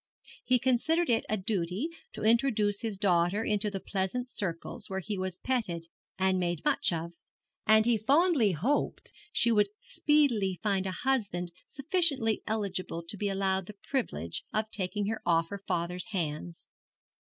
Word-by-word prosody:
He 255 Hz, -, +3 dB
considered 260 Hz, +6 st, +2 dB
it 225 Hz, -, +1 dB
a 215 Hz, -, +1 dB
duty 190 Hz, -, -1 dB, 0.3 s
to -, -, -6 dB
introduce 220 Hz, -3 st, +3 dB
his 220 Hz, -4 st, -3 dB
daughter 185 Hz, +1 st, +2 dB
into 210 Hz, -1 st, +1 dB
the 195 Hz, -1 st, -4 dB
pleasant 195 Hz, +7 st, -2 dB
circles 175 Hz, -8 st, -4 dB
where 190 Hz, 0 st, -2 dB
he 205 Hz, +3 st, -4 dB
was 185 Hz, -2 st, -3 dB
petted 185 Hz, -9 st, -2 dB, 0.3 s
and 190 Hz, 0 st, +2 dB
made 175 Hz, -3 st, -2 dB
much -, -, +4 dB
of; 170 Hz, 0 st, -3 dB, 0.6 s
and 220 Hz, +1 st, +6 dB
he 235 Hz, -2 st, +4 dB
fondly 275 Hz, -, +3 dB
hoped 230 Hz, -, -1 dB, 0.2 s
she 235 Hz, -, +3 dB
would 210 Hz, -2 st, +3 dB
speedily 235 Hz, -, +1 dB
find 195 Hz, -2 st, +1 dB
a -, -, -2 dB
husband 200 Hz, -10 st, 0 dB, 0.2 s
sufficiently 275 Hz, -, +2 dB
eligible 190 Hz, -5 st, -2 dB
to -, -, -2 dB
be 205 Hz, 0 st, -1 dB
allowed 190 Hz, -1 st, 0 dB
the 210 Hz, -, -9 dB, 0.2 s
privilege 85 Hz, -, -2 dB
of 215 Hz, 0 st, -1 dB
taking 205 Hz, +1 st, -1 dB
her 220 Hz, +2 st, -2 dB
off 165 Hz, -1 st, +2 dB
her 200 Hz, -1 st, -6 dB
father's 180 Hz, 0 st, -1 dB
hands. 170 Hz, -4 st, -4 dB
205 Hz, 155 wpm, -30 LUFS, 180-230 Hz, 0.6 s, and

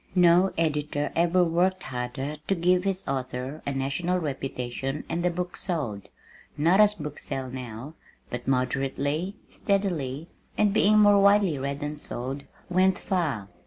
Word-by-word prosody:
No 180 Hz, +1 st, +5 dB
editor 150 Hz, -2 st, 0 dB
ever 175 Hz, +2 st, +3 dB
worked 180 Hz, +2 st, +1 dB
harder 130 Hz, +3 st, -4 dB
to 195 Hz, -, +2 dB
give 180 Hz, +1 st, +2 dB
his 195 Hz, -1 st, -2 dB
author 130 Hz, +1 st, -3 dB
a -, -, +1 dB
national 140 Hz, +7 st, -1 dB
reputation 135 Hz, -2 st, -3 dB
and 170 Hz, +1 st, -2 dB
the 180 Hz, -, +3 dB
book 180 Hz, +1 st, -4 dB
sold, 140 Hz, -, -3 dB, 0.5 s
not 170 Hz, +6 st, +4 dB
as 210 Hz, 0 st, +5 dB
books 150 Hz, -5 st, -7 dB
sell 130 Hz, -2 st, -4 dB
now, 125 Hz, +2 st, -7 dB, 0.4 s
but 125 Hz, 0 st, -5 dB
moderately, 135 Hz, -, 0 dB
steadily, 165 Hz, -8 st, -1 dB, 0.3 s
and 210 Hz, -2 st, +3 dB
being 215 Hz, 0 st, +4 dB
more 205 Hz, -1 st, +6 dB
widely 200 Hz, -6 st, +4 dB
read 140 Hz, +2 st, -3 dB
than 150 Hz, 0 st, -4 dB
sold, 135 Hz, +1 st, -2 dB, 0.2 s
went 185 Hz, +1 st, +3 dB
far. 155 Hz, -, -1 dB
150 Hz, 145 wpm, -26 LUFS, 135-180 Hz, 0.5 s, more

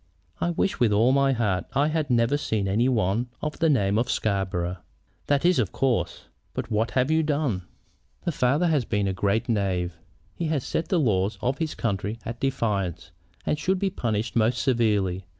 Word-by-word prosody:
"I 175 Hz, -, 0 dB
wish 175 Hz, +3 st, 0 dB
with 120 Hz, -3 st, +3 dB
all 110 Hz, +5 st, +4 dB
my 140 Hz, 0 st, +3 dB
heart 105 Hz, -7 st, 0 dB
I 140 Hz, +3 st, +2 dB
had 155 Hz, -2 st, -1 dB
never 120 Hz, +2 st, +3 dB
seen 110 Hz, -8 st, -1 dB
any 115 Hz, +6 st, +2 dB
one 115 Hz, 0 st, +1 dB
of 150 Hz, 0 st, -4 dB
the 165 Hz, -1 st, +3 dB
name 105 Hz, -7 st, +2 dB
of 120 Hz, +1 st, -1 dB
Scarborough!" 95 Hz, -3 st, -1 dB, 0.5 s
"That 145 Hz, +2 st, +2 dB
is 180 Hz, -5 st, +4 dB
of 105 Hz, -6 st, 0 dB
course; 120 Hz, -10 st, 0 dB, 0.3 s
but -, -, -4 dB
what 110 Hz, +2 st, +1 dB
have 130 Hz, +4 st, +2 dB
you 160 Hz, 0 st, +4 dB
done?" 145 Hz, -, -1 dB, 0.6 s
"The 170 Hz, -, +1 dB
father 145 Hz, +4 st, +2 dB
has 150 Hz, -5 st, +2 dB
been 105 Hz, -3 st, 0 dB
a 95 Hz, -, 0 dB
great 100 Hz, +4 st, 0 dB
knave. 90 Hz, -6 st, -1 dB, 0.3 s
He 170 Hz, -, -4 dB
has 150 Hz, -4 st, 0 dB
set 165 Hz, -, -2 dB
the 180 Hz, -, +2 dB
laws 100 Hz, -6 st, +1 dB
of 130 Hz, +5 st, -1 dB
his 160 Hz, -2 st, -2 dB
country 105 Hz, 0 st, -2 dB
at 120 Hz, +1 st, -5 dB
defiance, 105 Hz, -, -1 dB, 0.3 s
and 150 Hz, -, 0 dB
should 190 Hz, +4 st, +1 dB
be 195 Hz, 0 st, 0 dB
punished 110 Hz, -, -2 dB
most 115 Hz, +1 st, +2 dB
severely. 105 Hz, -8 st, +1 dB
115 Hz, 190 wpm, -25 LUFS, 100-140 Hz, 0.6 s, all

